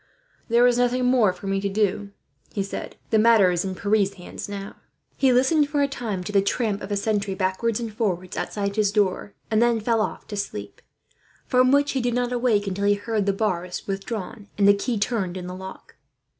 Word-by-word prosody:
"There 235 Hz, +1 st, +5 dB
is 245 Hz, 0 st, +3 dB
nothing 250 Hz, +1 st, +2 dB
more 245 Hz, -6 st, +4 dB
for 180 Hz, +2 st, -12 dB
me 195 Hz, 0 st, 0 dB
to 200 Hz, -, -1 dB
do," 205 Hz, 0 st, 0 dB, 0.4 s
he 200 Hz, -, -2 dB
said. 195 Hz, -, -6 dB, 0.2 s
"The 220 Hz, -, +4 dB
matter 215 Hz, -4 st, +5 dB
is 175 Hz, -1 st, 0 dB
in 190 Hz, -1 st, -4 dB
Pierre's 200 Hz, 0 st, +1 dB
hands, 180 Hz, +2 st, -8 dB
now." 200 Hz, 0 st, -7 dB, 0.4 s
He 265 Hz, -2 st, +3 dB
listened 285 Hz, +4 st, +3 dB
for 290 Hz, -1 st, +1 dB
a -, -, +2 dB
time 225 Hz, -9 st, -4 dB
to 195 Hz, -, -5 dB
the 200 Hz, -1 st, +4 dB
tramp 210 Hz, 0 st, -1 dB
of 200 Hz, -, -7 dB
a 205 Hz, -, +1 dB
sentry, 200 Hz, -2 st, -1 dB
backwards 190 Hz, +5 st, 0 dB
and 230 Hz, -2 st, -5 dB
forwards 185 Hz, -4 st, -2 dB
outside 200 Hz, 0 st, -3 dB
his 210 Hz, -2 st, +3 dB
door; 205 Hz, -1 st, 0 dB, 0.2 s
and 215 Hz, 0 st, +3 dB
then 235 Hz, -1 st, +3 dB
fell 225 Hz, +1 st, +1 dB
off -, -, -3 dB
to 210 Hz, -, -5 dB
sleep, 105 Hz, -, -5 dB, 0.6 s
from 255 Hz, 0 st, +3 dB
which 285 Hz, +1 st, +3 dB
he 265 Hz, -, -1 dB
did 240 Hz, 0 st, 0 dB
not 245 Hz, 0 st, 0 dB
awake 235 Hz, -4 st, +1 dB
until 195 Hz, +1 st, -2 dB
he 205 Hz, 0 st, +4 dB
heard 205 Hz, 0 st, -2 dB
the -, -, +4 dB
bars 180 Hz, -3 st, -2 dB
withdrawn, 200 Hz, +1 st, -5 dB
and 200 Hz, -1 st, +4 dB
the 200 Hz, -, +8 dB
key 220 Hz, +4 st, -2 dB
turned 200 Hz, -4 st, -1 dB
in 180 Hz, -, -6 dB
the 180 Hz, -, -6 dB
lock. 190 Hz, +1 st, -10 dB
205 Hz, 215 wpm, -24 LUFS, 195-235 Hz, 0.6 s, the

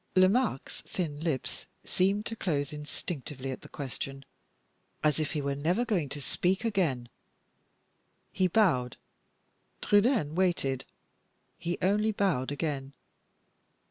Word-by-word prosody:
Lomaque's 190 Hz, -, +3 dB
thin 155 Hz, -6 st, -2 dB
lips 155 Hz, -5 st, -2 dB, 0.2 s
seemed 200 Hz, +3 st, +1 dB
to 230 Hz, -, -3 dB
close 145 Hz, -9 st, -1 dB
instinctively 150 Hz, -2 st, -5 dB
at 130 Hz, -, -6 dB
the -, -, -12 dB
question, 135 Hz, 0 st, -5 dB, 0.8 s
as 150 Hz, -1 st, +3 dB
if 155 Hz, -, -1 dB
he 150 Hz, -2 st, -1 dB
were 140 Hz, 0 st, 0 dB
never 170 Hz, +12 st, +1 dB
going 180 Hz, -, 0 dB
to 145 Hz, -, -3 dB
speak 190 Hz, -, +1 dB
again. 165 Hz, -, +1 dB, 1.2 s
He 185 Hz, -, +2 dB
bowed 165 Hz, -, +3 dB, 0.8 s
Trudaine 205 Hz, -, +3 dB
waited 160 Hz, -7 st, +1 dB, 0.7 s
he 175 Hz, +1 st, -2 dB
only 210 Hz, +3 st, +3 dB
bowed 180 Hz, -11 st, +1 dB
again. 140 Hz, -2 st, -2 dB
160 Hz, 115 wpm, -30 LUFS, 140-195 Hz, 1.2 s, Lomaque's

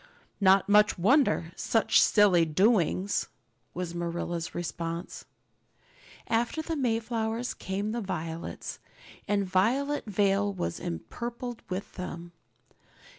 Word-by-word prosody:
"Not 195 Hz, -1 st, +5 dB
much 210 Hz, +1 st, +5 dB
wonder! 205 Hz, -, +3 dB
Such 225 Hz, -3 st, +3 dB
silly 200 Hz, -5 st, +5 dB
doings!" 185 Hz, +3 st, +2 dB, 0.5 s
was 180 Hz, -1 st, -4 dB
Marilla's 170 Hz, 0 st, -3 dB
response. 170 Hz, 0 st, -5 dB, 1.0 s
After 235 Hz, +7 st, 0 dB
the 325 Hz, 0 st, -3 dB
Mayflowers 230 Hz, -2 st, -1 dB
came 200 Hz, +3 st, -3 dB
the 235 Hz, +1 st, -2 dB
violets, 165 Hz, -4 st, -5 dB, 0.5 s
and 200 Hz, -1 st, +1 dB
Violet 250 Hz, +11 st, +1 dB
Vale 200 Hz, 0 st, +2 dB
was 85 Hz, -, -3 dB
empurpled 235 Hz, -, -5 dB
with 185 Hz, +2 st, -4 dB
them. 175 Hz, -2 st, -6 dB
200 Hz, 100 wpm, -28 LUFS, 175-225 Hz, 1.0 s, Not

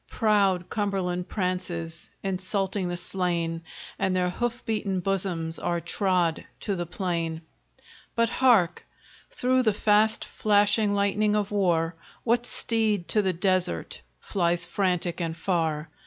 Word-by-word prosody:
Proud 200 Hz, -5 st, +2 dB
Cumberland 190 Hz, -4 st, -2 dB
prances, 180 Hz, -4 st, -3 dB
insulting 190 Hz, 0 st, -1 dB
the 175 Hz, -, -3 dB
slain, 170 Hz, -2 st, -2 dB, 0.4 s
And 190 Hz, -1 st, +1 dB
their 180 Hz, -1 st, +1 dB
hoof 240 Hz, +4 st, -3 dB
beaten 205 Hz, -4 st, -1 dB
bosoms 175 Hz, -3 st, -2 dB
are 170 Hz, 0 st, -1 dB
trod 180 Hz, -3 st, 0 dB, 0.2 s
to 200 Hz, -, -1 dB
the 175 Hz, -1 st, -3 dB
plain. 170 Hz, -3 st, -2 dB, 0.7 s
But 230 Hz, 0 st, +3 dB
hark! 225 Hz, -10 st, +3 dB, 0.5 s
through 255 Hz, +1 st, +2 dB
the 215 Hz, -5 st, +2 dB
fast 215 Hz, +1 st, +3 dB
flashing 205 Hz, 0 st, +2 dB
lightning 205 Hz, +1 st, +2 dB
of 210 Hz, -1 st, 0 dB
war, 175 Hz, -5 st, +2 dB, 0.3 s
What 240 Hz, +1 st, +1 dB
steed 215 Hz, -6 st, 0 dB
to 215 Hz, -, +4 dB
the 190 Hz, -2 st, 0 dB
desert 180 Hz, -, 0 dB, 0.2 s
flies 175 Hz, -, 0 dB
frantic 180 Hz, -2 st, -1 dB
and 165 Hz, -1 st, -2 dB
far? 160 Hz, -3 st, -1 dB
185 Hz, 125 wpm, -26 LUFS, 175-210 Hz, 0.7 s, to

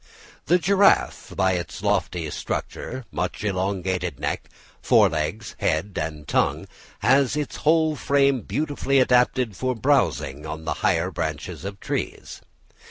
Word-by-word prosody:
The 180 Hz, -, +5 dB
giraffe, 195 Hz, +3 st, +3 dB
by 95 Hz, 0 st, +2 dB
its 85 Hz, -3 st, -4 dB
lofty 85 Hz, -3 st, 0 dB
stature, 130 Hz, -, -5 dB
much -, -, -3 dB
elongated 95 Hz, -, -1 dB
neck, -, -, -3 dB, 0.3 s
fore -, -, +5 dB
legs, 80 Hz, +7 st, -3 dB
head 90 Hz, +6 st, 0 dB
and 75 Hz, -2 st, -5 dB
tongue, -, -, +1 dB, 0.3 s
has 135 Hz, +1 st, +3 dB
its 150 Hz, -1 st, -3 dB
whole 160 Hz, 0 st, +3 dB
frame 140 Hz, -2 st, +2 dB
beautifully 145 Hz, -1 st, -1 dB
adapted 125 Hz, -3 st, +3 dB
for 130 Hz, +3 st, -1 dB
browsing 115 Hz, -, +1 dB
on 80 Hz, +1 st, -6 dB
the -, -, 0 dB
higher 85 Hz, +3 st, +1 dB
branches 80 Hz, +1 st, -4 dB
of 100 Hz, 0 st, -6 dB
trees. -, -, -4 dB
100 Hz, 130 wpm, -24 LUFS, 85-140 Hz, 0.3 s, The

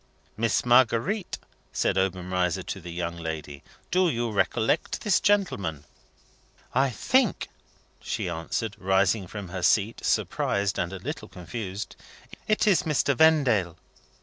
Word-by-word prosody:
"Miss 115 Hz, +3 st, +1 dB
Marguerite," 130 Hz, -, +3 dB, 0.3 s
said -, -, 0 dB
Obenreizer 90 Hz, -1 st, 0 dB
to 95 Hz, -, -6 dB
the 85 Hz, 0 st, -8 dB
young 85 Hz, 0 st, -4 dB
lady, 80 Hz, -4 st, -6 dB, 0.3 s
"do 185 Hz, -1 st, +3 dB
you 120 Hz, -4 st, -1 dB
recollect 110 Hz, -, 0 dB
this 210 Hz, -4 st, +3 dB
gentleman?" 100 Hz, -, 0 dB, 0.9 s
"I 135 Hz, +2 st, +3 dB
think," 230 Hz, -, +1 dB, 0.5 s
she -, -, -3 dB
answered, 85 Hz, +6 st, -3 dB
rising 95 Hz, +1 st, +2 dB
from 100 Hz, -1 st, -7 dB
her 90 Hz, 0 st, -5 dB
seat, 105 Hz, +5 st, +2 dB
surprised 100 Hz, 0 st, 0 dB
and 85 Hz, -, -1 dB
a 95 Hz, -, -5 dB
little 120 Hz, -, -6 dB
confused: 95 Hz, +2 st, -6 dB, 0.5 s
"it 215 Hz, +1 st, +2 dB
is 195 Hz, -4 st, +4 dB
Mr. 150 Hz, -4 st, +1 dB
Vendale?" 125 Hz, -, +3 dB
100 Hz, 125 wpm, -26 LUFS, 90-135 Hz, 0.9 s, is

